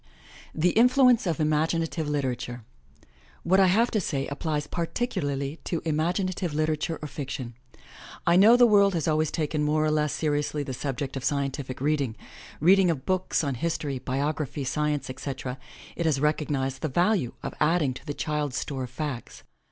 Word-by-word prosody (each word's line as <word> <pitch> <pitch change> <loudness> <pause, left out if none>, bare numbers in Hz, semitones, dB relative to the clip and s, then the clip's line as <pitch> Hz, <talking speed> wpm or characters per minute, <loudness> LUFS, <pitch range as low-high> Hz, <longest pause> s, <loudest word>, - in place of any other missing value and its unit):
THE 175 +3 +3
INFLUENCE 250 -1 +5
OF 165 -1 -1
IMAGINATIVE 160 +1 0
LITERATURE 125 -4 -3 0.8
What 190 +3 +3
I 190 - +6
have 225 +6 +3
to 215 - +1
say 135 -5 -2
applies 150 +1 -2
particularly 150 - -2
to 170 - -2
imaginative 175 +2 -1
liter 155 0 +1
ature 160 +2 -3
or - - -3
fiction. 135 -3 -6 0.7
I 170 - +4
know 215 +6 +7
the 245 - +7
world 200 -4 +5
has 165 -2 -1
always 155 -1 +2
taken 155 -1 -1
more 155 +1 +2
or 155 - +2
less 150 -1 +1
seriously 150 -1 -1
the 135 - -5
subject 135 +1 -4
of 135 - -4
scientific 140 -2 -2
reading 140 -4 0 0.3
— - - -17
reading 185 +3 +5
of 150 -6 -2
books 185 -2 0
on 140 -2 -1
history, 145 0 -2
biography, 145 +2 -2
science, 150 +1 -1
etc. 130 0 -5 0.4
It 170 - -1
has 145 -4 +2
recognized 145 -3 -1
the 155 - 0
value 175 - +1
of - - -4
addmg 150 -3 +2
to - - -15
the 145 - -3
child's 150 -4 -2
store 135 -3 -3
of - - -11
facts. 130 -2 -6
150 Hz, 170 wpm, -26 LUFS, 140-170 Hz, 0.8 s, know